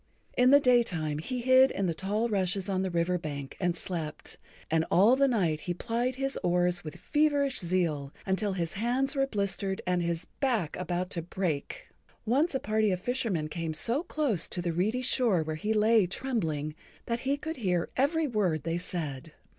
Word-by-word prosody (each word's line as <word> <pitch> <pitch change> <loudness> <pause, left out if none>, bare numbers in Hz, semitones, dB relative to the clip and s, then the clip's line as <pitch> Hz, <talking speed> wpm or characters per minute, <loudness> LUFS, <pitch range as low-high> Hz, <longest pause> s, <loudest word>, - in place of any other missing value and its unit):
In 250 +1 +5
the 285 +1 +8
daytime 185 - +2
he 250 +10 -3
hid 260 +2 +6
in 195 - -2
the 170 - 0
tall 205 +7 -1
rushes 195 -2 -1
on 190 -2 0
the 190 - -1
river 175 +1 0
bank 145 -4 -6
and 175 -2 0
slept, 165 -5 -5 0.3
and 160 0 +3
all 210 +8 +6
the 275 +1 +4
night 180 - +1
he 175 - 0
plied 240 +6 -1
his 270 +1 -2
oars 175 0 +1
with 155 -2 -7
feverish 290 -3 +1
zeal, 165 -6 0
until 195 +1 0
his 170 -3 -2
hands 250 +7 0
were 270 0 +2
blistered 200 -3 -2
and 180 -1 +1
his 170 0 -2
back 230 - 0
about 180 +1 -2
to 170 - -2
break. 175 - -3 0.4
Once 275 +7 +2
a - - +1
party 215 -1 +1
of 185 -2 0
fishermen 215 -8 -1
came 160 0 -4
so 240 - +1
close 290 - -1
to - - -5
the 170 -1 -1
reedy 215 +9 0
shore 235 -9 +2
where 155 0 -3
he 210 +7 -2
lay 215 -2 +4
trembling 165 - -2 0.3
that 235 0 -1
he 275 +3 0
could 315 +2 -5
hear 180 -7 0
every 310 +5 +2
word 185 - 0
they 165 +1 -1
said. 155 -4 -5
190 Hz, 185 wpm, -29 LUFS, 170-250 Hz, 0.4 s, the